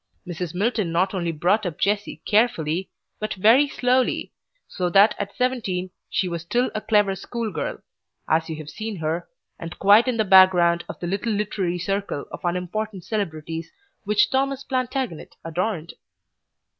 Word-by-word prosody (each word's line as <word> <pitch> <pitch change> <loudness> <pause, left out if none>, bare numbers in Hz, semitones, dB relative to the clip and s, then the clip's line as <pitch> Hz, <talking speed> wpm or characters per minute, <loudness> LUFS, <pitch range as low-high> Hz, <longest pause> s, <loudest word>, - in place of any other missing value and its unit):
Mrs. 175 -1 -5
Milton 205 -2 0
not 185 +4 +1
only 170 -3 -1
brought 180 +8 +1
up 175 -5 -4
Jessie 205 +1 -1
carefully, 190 -6 +1 0.3
but 215 - -3
very 225 +9 +5
slowly, 255 -1 0 0.3
so 180 -2 -2
that 200 +4 +6
at 200 0 -4
seventeen 200 -8 -1 0.2
she 185 - 0
was 170 -2 -3
still 240 +9 0
a 215 - -3
clever 210 -2 +2
schoolgirl 220 +1 -4 0.5
(as 160 +1 +1
you 160 - -3
have 155 -1 -8
seen 220 -1 -5
her) 165 0 -3 0.3
and 165 +1 -7
quite 205 +5 +6
in 250 -2 0
the 220 - +2
background 185 -3 +6
of - - -7
the - - -4
little 200 +5 -1
literary 200 -4 -1
circle 195 -4 -2
of - - -8
unimportant 180 +3 -3
celebrities 165 -6 -4 0.3
which 210 0 +2
'Thomas 275 0 0
Plantagenet' 255 - -3
adorned. 170 0 -2
195 Hz, 155 wpm, -23 LUFS, 170-220 Hz, 0.5 s, that